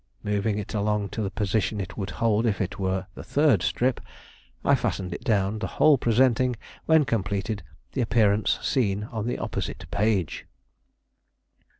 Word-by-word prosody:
Moving 105 0 0
it 105 - -5
along 105 -1 0
to 110 - -4
the 100 - -1
position 105 +1 -1
it 95 -1 -5
would 100 -3 -4
hold 115 0 +1
if 105 - 0
it 95 - -3
were 95 0 -1
the - - -9
third 145 - +3
strip, 125 +5 0 0.6
I - - +5
fastened 95 -2 -1
it - - -7
down; 105 -3 +1
the - - -2
whole 150 -4 +6
presenting, 125 +2 +3 0.3
when 160 -2 +5
completed, 100 -1 -1 0.3
the 130 - -1
appearance 110 -3 +2
seen 105 -6 +1
on 110 -1 -3
the 120 - -1
opposite - - -4
page. 100 -5 0
105 Hz, 160 wpm, -26 LUFS, 100-120 Hz, 0.6 s, whole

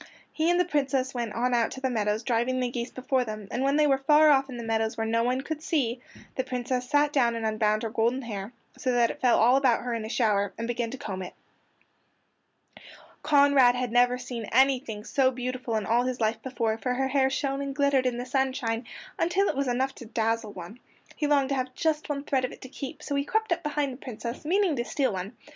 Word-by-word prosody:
He 320 +1 +1
and 350 0 +3
the 360 - +3
Princess 275 -4 0
went 235 -4 -3
on 250 +2 0
out 235 -1 +2
to - - -8
the 265 - 0
meadows 215 -1 0
driving 245 +2 0
the 250 -1 -1
geese 240 0 -3
before 260 0 -1
them, 215 -3 -7
and 245 - -2
when 275 +1 +2
they 300 0 +4
were 270 -2 +3
far 300 +3 +5
off 275 -1 +3
in 250 - -7
the 235 - -5
meadows 225 -1 -1
where 225 - -1
no 230 +1 +1
one 250 +2 0
could 310 +2 -5
see, 255 -7 -1 0.3
the 260 - -1
Princess 250 0 -3
sat 290 0 +3
down 240 -4 +2
and 225 -1 -3
unbound 215 0 +1
her 225 - -3
golden 235 +4 0
hair, 210 -2 -5 0.2
so 255 - -1
that 240 -1 +3
it - - -12
fell 250 -2 +4
all 245 +3 +5
about 260 -4 +2
her 245 -1 -2
in 230 -1 -3
a 220 - -6
shower, 205 -5 +1
and 230 - -3
began 240 -1 -2
to 265 - -6
comb 190 -6 -5
it. 180 - -8 1.9
Conrad 280 -4 +5
had 250 -2 -2
never 245 +1 +4
seen 245 -2 -6
anything 255 -4 +2
so 260 +3 +2
beautiful 255 -2 -4
in 215 -2 -1
all 235 +4 +2
his 255 -1 -2
life 220 0 0
before, 230 -4 -2
for 250 +1 -1
her 265 +1 0
hair 265 -1 +3
shone 275 0 -2
and 275 -1 -4
glittered 280 -3 +2
in 245 -1 -1
the 245 - -4
sunshine 255 -3 -1 0.3
until 370 +4 +2
it - - -1
was 275 0 -1
enough 260 +2 0
to 235 - -11
dazzle 225 -1 -1
one. 180 +6 -9 0.4
He 300 - -1
longed 280 -2 +2
to 275 - 0
have 255 -1 -3
just 310 -2 -1
one 280 -1 -2
thread 270 -3 0
of 255 - -2
it - - -13
to 260 - -9
keep, 275 +2 -7
so 285 - -4
he 280 0 +1
crept 440 +6 -1
up 345 - +1
behind 295 -3 -1
the - - -10
Princess, 235 +1 -6
meaning 365 0 +2
to 240 - 0
steal 250 +1 -1
one. 190 +4 -5
255 Hz, 240 wpm, -27 LUFS, 230-275 Hz, 1.9 s, far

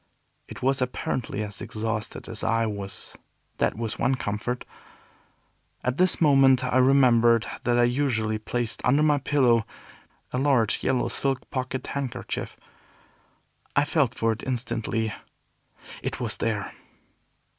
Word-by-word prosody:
It - - -9
was 135 +1 +2
apparently 125 -3 -2
as 105 -3 -7
exhausted 110 0 -4
as - - -7
I 115 0 +2
was; 100 -2 -5 0.5
that - - +1
was 115 -1 -4
one 135 - +2
comfort. 115 +2 -3 1.2
At 125 +4 -1
this 185 0 +3
moment 135 -4 +5
I 125 0 +1
remembered 120 -3 +5 0.2
that 120 0 +3
I 120 - +5
usually 120 -4 +1
placed 120 +1 -3
under 140 +4 +4
my 150 -2 +3
pillow, 130 -4 +3
before - - +1
going 110 - -7
to - - -23
bed, 125 - -1
a - - 0
large 125 -7 +2
yellow 130 -1 +1
silk 135 -2 -2
pocket 130 -1 -3
handkerchief. 130 -3 -4 1.2
I 145 - +4
felt 140 -5 +1
for 115 -1 +1
it 110 - -4
instantly; 115 -3 -2 0.9
it - - -4
was - - 0
there. - - -2
125 Hz, 145 wpm, -26 LUFS, 115-135 Hz, 1.2 s, moment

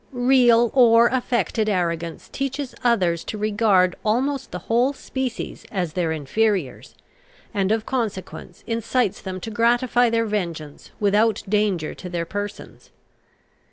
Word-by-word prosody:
Real 245 -2 +4
or 235 -2 +6
affected 235 -4 0
arrogance 170 -3 -2
teaches 275 0 -4
others 185 -9 +2
to 215 - -5
regard 205 -4 +2
almost 260 +5 0
the - - -5
whole 245 +5 +2
species 260 -3 -5
as 180 -6 -2
their 170 -2 -1
inferiors, 160 +1 -1 0.6
and 195 -1 0
of 220 0 0
consequence 200 -8 -4
incites 230 -2 -1
them 185 -1 -5
to 225 - -6
gratify 240 +2 +2
their 230 0 +1
vengeance 170 -8 -4
without 210 +2 +2
danger 200 -6 0
to 180 - -9
their 170 -1 -3
persons. 205 +3 -7
215 Hz, 125 wpm, -22 LUFS, 185-240 Hz, 0.6 s, or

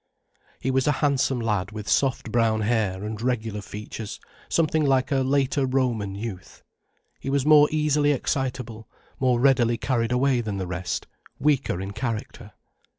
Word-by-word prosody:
He 130 - -1
was 130 +1 +1
a 150 - +4
handsome 135 -3 +1
lad 105 -4 -1
with 105 -1 -7
soft 130 -4 +1
brown 115 -2 +2
hair 105 -4 0
and 110 0 -5
regular 115 -4 -1
features 105 +1 -7 0.3
something 160 -1 +2
like 135 -1 +2
a 135 - +3
later 135 +1 +1
Roman 120 -7 0
youth. 100 -3 -7 0.6
He - - -5
was 140 -1 +1
more 150 -1 +7
easily 150 -1 +2
excitable, 125 -5 -3 0.3
more 125 -2 +2
readily 120 -3 +3
carried 120 -1 0
away 125 0 +2
than 105 -3 -4
the 95 - -3
rest, 90 0 -3 0.3
weaker 140 -10 +1
in 95 +1 -5
character. 115 -1 -5
125 Hz, 150 wpm, -25 LUFS, 110-135 Hz, 0.6 s, more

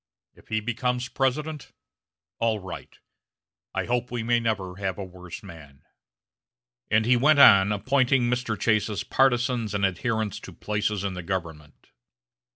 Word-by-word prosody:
If - - -22
he 110 0 -1
becomes 125 +2 -2
President, 150 +3 -2 0.7
all 115 -1 +1
right. 95 -3 -9 0.8
I - - -1
hope 125 +1 -1
we 120 -2 -3
may 120 +1 +2
never 100 -5 -2
have 95 -2 -3
a 100 - -5
worse 90 -1 -10
man." 70 -5 -13 1.1
And 110 +1 +3
he 125 +2 +4
went 145 +5 +4
on 100 -7 +7
appointing 130 +4 +2
Mr. 120 -3 -1
Chase's 105 -3 0
partizans 120 -4 +1
and 100 -1 +2
adherents 110 +2 -2
to - - -11
places 105 -1 -2
in 100 -1 -2
the 90 - -5
government. 80 -5 -6
110 Hz, 145 wpm, -25 LUFS, 95-125 Hz, 1.1 s, on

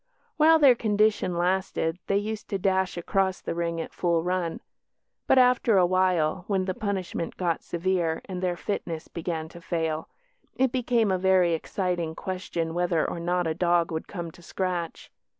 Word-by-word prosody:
While 320 +1 +6
their 280 -5 +7
condition 210 -5 +1
lasted 180 -2 0
they 200 - +2
used 215 +1 -4
to 200 - -1
dash 190 -1 0
across 190 +2 0
the - - -4
ring 170 0 -2
at 165 - -5
full 170 -2 +1
run; 180 -2 -1 0.7
but, - - +5
after 250 -4 +4
a 180 - +5
while, 180 -2 +1
when 190 -2 0
the 185 - -1
punishment 190 -4 -3
got 170 -3 0
severe 170 -2 -1
and 185 -2 -5
their 180 -1 -1
"fitness" 170 -5 -4
began 165 -2 -4
to 170 - -12
fail, 160 -2 -2 0.5
it 260 -1 +2
became 240 -4 +1
a 185 - +1
very 185 -2 +4
exciting 170 -1 -2
question 175 -3 -3
whether 175 -2 +1
or - - -4
not 175 +1 0
a 160 - 0
dog 170 0 +2
would 160 0 -4
"come 170 -4 -6
to 175 - -17
scratch". 175 -2 -4
180 Hz, 170 wpm, -26 LUFS, 170-195 Hz, 0.7 s, their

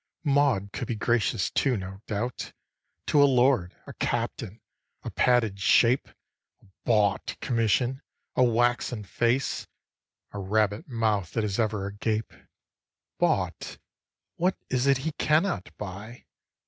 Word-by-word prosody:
Maud 140 -9 +2
could - - -4
be 120 - -2
gracious 105 -5 0
too, 130 -4 +1
no 95 0 -7
doubt, 115 +4 -4 0.5
To 145 - +4
a - - +8
lord, 125 -8 +3
a - - -9
captain, 105 +5 -3 0.4
a - - -5
padded 115 -6 +2
shape, 120 +6 +4 0.5
A - - -25 0.2
bought 105 -4 +1
commission, 120 +3 +1 0.3
a - - +4
waxen 120 -1 +1
face, 120 +6 0 0.6
A 100 - -6
rabbit 105 +1 0
mouth 110 -7 0
that 115 - 0
is 105 +1 -2
ever 105 -3 0
agape 105 +2 -2 0.9
Bought? - - 0 0.6
what 180 +2 +1
is 125 +1 +1
it 135 -1 +5
he 160 - 0
cannot 155 - +1
buy? 105 +4 -8
115 Hz, 125 wpm, -27 LUFS, 100-125 Hz, 0.9 s, a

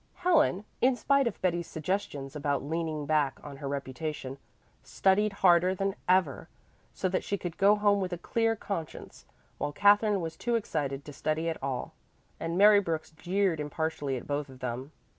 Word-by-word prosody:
Helen, 310 - +2 0.2
in 255 +1 +4
spite 275 +1 +2
of 230 - -4
Betty's 175 -2 0
suggestions 155 -5 -3
about 145 -2 -1
leaning 155 0 -2
back 145 -2 +1
on 140 -2 -9
her 140 - -6
reputation, 140 0 -4 0.4
studied 205 +2 +2
harder 180 +1 +5
than 195 +1 -1 0.2
ever, 180 -7 +2 0.4
so - - -2
that 185 - -1
she 200 - -2
could 175 -3 -5
go 200 +2 +5
home 205 -1 +2
with 185 -1 -2
a 175 - -3
clear 225 +5 0
conscience, 195 -7 -6 0.3
while 145 - -1
Katherine 205 +4 +4
was 165 -2 -4
too 240 +7 -1
excited 145 -10 -2
to 150 - -9
study 155 +4 -1
at 160 - -5
all, 135 -2 -3 0.5
and 165 +1 -2
Mary 205 +1 +7
Brooks 165 -5 -3
jeered 180 +1 0
impartially 150 -2 -2
at - - -8
both 145 0 -2
of 130 -1 -13
them. 130 +3 -4
165 Hz, 175 wpm, -29 LUFS, 145-200 Hz, 0.5 s, Mary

